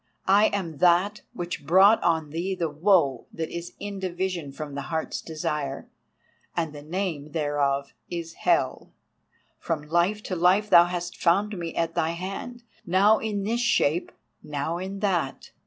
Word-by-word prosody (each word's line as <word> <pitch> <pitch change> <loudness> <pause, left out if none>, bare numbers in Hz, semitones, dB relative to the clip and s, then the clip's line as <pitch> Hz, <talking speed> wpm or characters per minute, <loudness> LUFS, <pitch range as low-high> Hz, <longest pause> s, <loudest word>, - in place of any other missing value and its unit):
I 200 +2 +5
am 170 -7 -3
that 180 +4 +3
which 175 -3 -5
brought 190 +8 +6
on 160 -3 +1
thee 180 +4 -2
the 170 -4 -2
woe 150 - +2
that 160 -1 -4
is 170 +1 -6
in 200 -1 -5
division 180 -4 -3
from 145 +1 -7
the 140 0 -5
Heart's 160 -1 -2
Desire, 150 -3 -4 0.7
and 160 -3 -1
the 145 - -9
name 155 -2 -4
thereof 145 -3 0 0.2
is 170 -2 -5
Hell. - - 0 0.7
From 160 -3 -2
Life 175 +7 +1
to 185 - -3
Life 185 +5 +3
thou 175 -1 +9
hast 175 0 -4
found 200 +5 +2
me 170 -2 -5
at 165 0 0
thy 160 +1 0
hand, 195 +7 -6 0.2
now 200 +3 +4
in 210 -3 -2
this 230 +4 0
shape, 175 -8 +2 0.3
now 150 +3 -3
in 195 +2 -5
that. 175 -9 -1
175 Hz, 155 wpm, -26 LUFS, 155-195 Hz, 0.7 s, thou